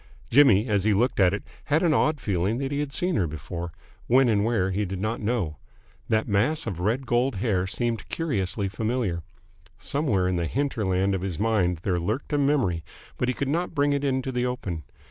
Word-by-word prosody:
Jimmy, 120 -5 +6
as 100 -4 +1
he 105 -1 +3
looked 120 +4 +1
at 95 -2 +5
it, 100 - -3 0.2
had 150 +4 +2
an 165 -3 +4
odd 155 0 +2
feeling 100 0 0
that 135 +1 -3
he 145 - -1
had 145 -1 -2
seen 180 +4 0
her 90 - +1
before 85 +3 -6 0.4
when 130 +1 +5
and 105 -2 +2
where 105 -5 +1
he 100 +3 0
did 95 -1 -4
not 110 +4 -2
know. 105 -9 -1 0.5
That 110 0 +1
mass 120 +10 +1
of 95 -7 -4
red 115 +8 0
gold 120 +1 +1
hair 95 -3 0
seemed 115 +2 -2
curiously 100 - -1
familiar. 110 -3 -1 0.6
Somewhere 130 -11 0
in 90 -1 0
the 85 -1 -1
hinterland 100 - 0
of 95 - -1
his 95 -4 -3
mind 95 -6 +1
there 90 -3 +1
lurked 110 - -3
a 145 - +2
memory, 135 - +1 0.4
but 125 - +1
he 125 - 0
could 140 - -2
not 170 +4 -1
bring 145 0 +2
it 140 0 -1
into 130 -1 0
the 125 -1 -1
open. 100 - -3
110 Hz, 205 wpm, -26 LUFS, 95-135 Hz, 0.6 s, Jimmy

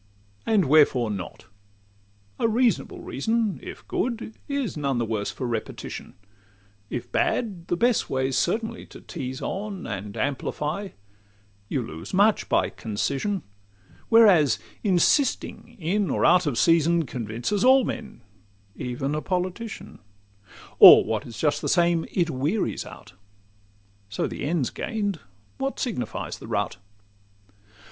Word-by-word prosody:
And 210 -5 +3
wherefore 135 -6 +4
not? 95 -4 -7 0.9
A - - +3
reasonable 235 +2 +1
reason, 225 -3 -1
If - - -10
good, 230 -2 -2
is 280 - -2
none 140 -4 -1
the 120 - 0
worse 110 -2 -2
for 130 - -5
repetition; 115 -2 -5 0.7
If 125 - -5
bad, 195 -8 -1
the 175 - 0
best 240 +3 +2
way 130 0 0
's - - -1
certainly 225 +5 -1
to - - -12
tease 130 -6 -6
on, 200 0 -4
And 100 -1 -6
amplify: 150 +7 -2 0.8
you 130 - -1
lose 80 - -7
much 205 +2 +3
by - - +2
concision, 140 - -2 0.7
Whereas 190 - +6 0.3
insisting 235 - +1
in 190 +4 0
or - - +1
out 180 -2 +5
of 130 -5 -1
season 165 +1 +3
Convinces 120 - -3
all 260 +1 +6
men, 220 - -6 0.5
even 130 +3 -3
a 155 - -1
politician; 185 +5 -4 0.8
Or—what - - +8
is 115 - -9
just 150 +3 +1
the - - -2
same—it 170 0 +1
wearies 150 +11 -1
out. - - -13 1.0
So 100 - -2
the - - -4
end 155 -2 0
's - - -2
gain'd, 205 -6 -3 0.4
what 270 0 -2
signifies 220 - -3
the - - -10
route? - - -2
170 Hz, 130 wpm, -25 LUFS, 130-215 Hz, 1.0 s, Or—what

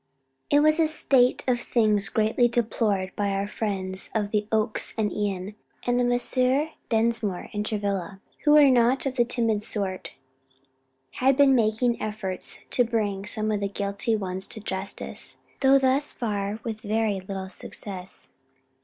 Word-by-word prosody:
It 290 - +5
was 310 +2 +4
a 320 - +4
state 265 -5 +3
of 245 -2 +2
things 215 -4 +2
greatly 220 +3 +2
deplored 215 -5 -1
by 205 -1 0
our 195 0 -1
friends 195 -3 -3
of 210 -2 -1
the 210 -1 0
Oaks 215 -1 +1
and 215 -2 0
Ion, 200 -1 -3 0.3
and 245 0 +2
Messrs. 255 +4 +2 0.2
Dinsmore 220 -4 0
and 210 0 -1
Travilla, 200 -3 -2 0.2
who 295 - +5
were 290 -3 +7
not 245 +2 +3
of 265 -1 -2
the 240 - +4
timid 230 -3 0
sort, 195 -3 -4 1.1
had 265 +1 +4
been 280 -2 +6
making 230 0 +1
efforts 210 -4 -4
to 245 - +4
bring 210 -4 -2
some 215 0 -1
of 210 - 0
the 200 - -1
guilty 200 +3 -1
ones 190 -2 -3
to 220 - -7
justice; 195 -1 -5 0.2
though 270 0 +6
thus 270 +2 +2
far 205 -2 -3
with 220 -2 -5
very 215 -1 0
little 190 0 -6
success. 190 0 -5
215 Hz, 155 wpm, -25 LUFS, 200-245 Hz, 1.1 s, were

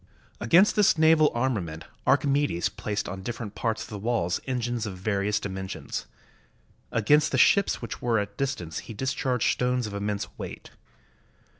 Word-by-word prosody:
Against 175 - +5
this 205 -5 +4
naval 160 -1 +5
armament 105 -11 -2 0.2
Archimedes 140 -11 +2
placed 105 0 -3
on 95 +1 -6
different 115 0 -5
parts 110 -1 -2
of - - -11
the 105 - -6
walls 105 -6 0
engines 120 -3 -2
of 95 -2 -6
various 100 +1 0
dimen 95 -2 -5
sions. - - -5 0.8
Against 150 +7 +3
the - - +1
ships 200 -10 +4
which 115 - -6
were 120 -2 +1
at 105 -1 -1
a - - -31
distance 105 - -3
he 115 - -9
discharged 130 0 0
stones 125 -1 0
of 105 - -6
immense 100 0 -2
weight. - - -8
115 Hz, 160 wpm, -26 LUFS, 100-130 Hz, 0.8 s, Against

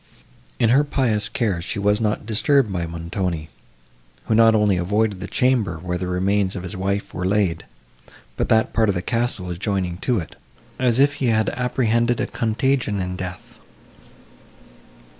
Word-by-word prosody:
In 115 -3 +3
her 135 +5 +5
pious 115 -7 0
cares 105 -8 -1
she - - -4
was 105 +2 +1
not 105 -1 -1
disturbed 115 +1 +2
by 85 -2 -2
Montoni, 85 -1 -4 0.8
who - - 0
not 115 0 +6
only 105 -2 +3
avoided 100 +3 0
the 95 - -6
chamber, 110 -5 +1
where 90 +2 -4
the 90 - -3
remains 95 +2 0
of 90 - -5
his 90 - -6
wife 100 +2 -2
were 90 - -4
laid, 95 -3 0 0.7
but - - -2
that 110 0 +3
part 110 -2 +2
of 100 - +1
the 90 - -2
castle 115 -6 -1
adjoining 90 -1 -2
to 120 +5 0
it, 85 -6 -5 0.4
as 125 -2 +2
if 140 +1 +4
he 130 - +2
had 110 -1 +2
apprehended 120 -1 0
a - - +1
contagion 115 -2 0
in 90 0 -3
death. 90 0 -8
105 Hz, 165 wpm, -22 LUFS, 90-115 Hz, 0.8 s, not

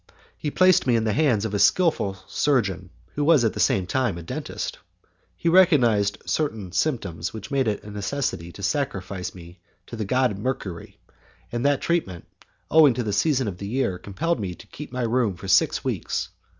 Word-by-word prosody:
He 150 - -3
placed 185 -1 +4
me 120 - +4
in 115 - +1
the 110 -2 0
hands 115 -6 +2
of 110 - -3
a 100 - 0
skilful 155 - +2
surgeon, 100 -10 0 0.2
who 145 - -1
was 145 -5 +5
at 110 - +1
the - - -6
same 95 - +2
time 120 -4 0
a 85 - -7
dentist. - - -5 0.6
He - - -3
recognized 125 - +4
certain 110 - -2
symptoms 100 - -2
which 110 -1 -8
made 135 -3 +1
it 105 -2 -1
a 105 - -9
necessity 100 - -3
to 100 - -10
sacrifice 95 -7 -2
me 85 0 -13 0.3
to - - -8
the 110 - -3
god 125 +1 +1
Mercury, 105 -7 -4 0.5
and 120 0 -2
that 145 -1 +2
treatment, 95 - -1 0.5
owing 150 -6 +6
to 125 - -1
the 105 -2 -2
season 135 +1 +2
of 95 -3 -5
the 100 - -5
year, 110 -6 -1
compelled 150 - -2
me 95 -4 -4
to - - -14
keep 150 - -10
my 125 -1 -2
room 115 -4 +1
for 95 - -9
six 95 0 +3
weeks. - - -2
110 Hz, 190 wpm, -24 LUFS, 95-140 Hz, 0.6 s, owing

